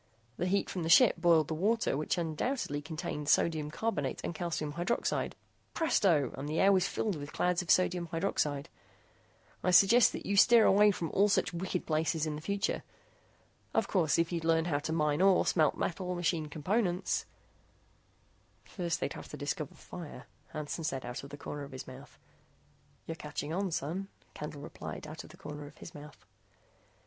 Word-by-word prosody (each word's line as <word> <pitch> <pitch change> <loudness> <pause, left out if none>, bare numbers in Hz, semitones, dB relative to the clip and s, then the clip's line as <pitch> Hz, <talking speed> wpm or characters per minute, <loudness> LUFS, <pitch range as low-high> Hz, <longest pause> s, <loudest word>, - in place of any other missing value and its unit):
The 180 - -1
heat 200 +2 +1
from 180 - -4
the 165 - -2
ship 225 +5 +7
boiled 165 -3 +4
the - - -2
water 210 +3 +1
which 150 +5 -1
undoubtedly 165 - -2
contained 150 -1 -4
sodium 155 -2 +2
carbonate 155 -6 -2
and - - -3
calcium 160 -2 -3
hydroxide; 175 +9 -1 0.4
presto, 175 - +2
and 140 +2 -5
the 155 - -1
air 195 - +6
was 190 -1 +3
filled 210 -4 -1
with 145 0 -7
clouds 180 0 +1
of 175 - -10
sodium 180 -2 +3
hydroxide. 155 -4 -1 1.0
"I - - +2
suggest 200 +6 +6
that - - -6
you 200 - 0
steer 230 +2 +7
away 210 +2 +6
from 170 -5 -2
all 205 +2 +3
such 180 -3 +1
wicked 180 +1 -3
places 160 0 0
in 155 -1 -2
the 150 - -7
future. 200 +4 -1 0.9
Of - - +2
course, 170 -6 +2
if 165 +1 +1
you'd 170 -2 -2
learn 165 0 +2
how 150 -4 0
to 155 +2 -4
mine 150 0 +1
ore, 190 -1 +5
smelt 155 -4 +2
metal, 180 +1 -2
machine 165 -2 0
components 180 +4 -1 0.7
" - - -37
"First 170 -3 -1
they'd - - -1
have - - -9
to - - -7
discover 145 0 -4
fire," 160 -7 -9 0.2
Hansen 155 +2 -5
said 135 -4 -2
out 120 +2 -5
of 140 - -9
the 145 - -8
corner 145 0 -6
of 140 -1 -8
his 130 - -7
mouth. 130 +2 -12 0.9
"You're 165 - -4
catching 150 -1 -5
on, 195 +2 0
son," 170 +5 -3 0.3
Candle 150 -1 -7 0.2
said, - - -6
out 155 +1 -8
of - - -14
the - - -15
corner 150 0 -8
of 145 - -15
his - - -10
mouth. 145 -1 -12
165 Hz, 185 wpm, -31 LUFS, 150-185 Hz, 1.0 s, ship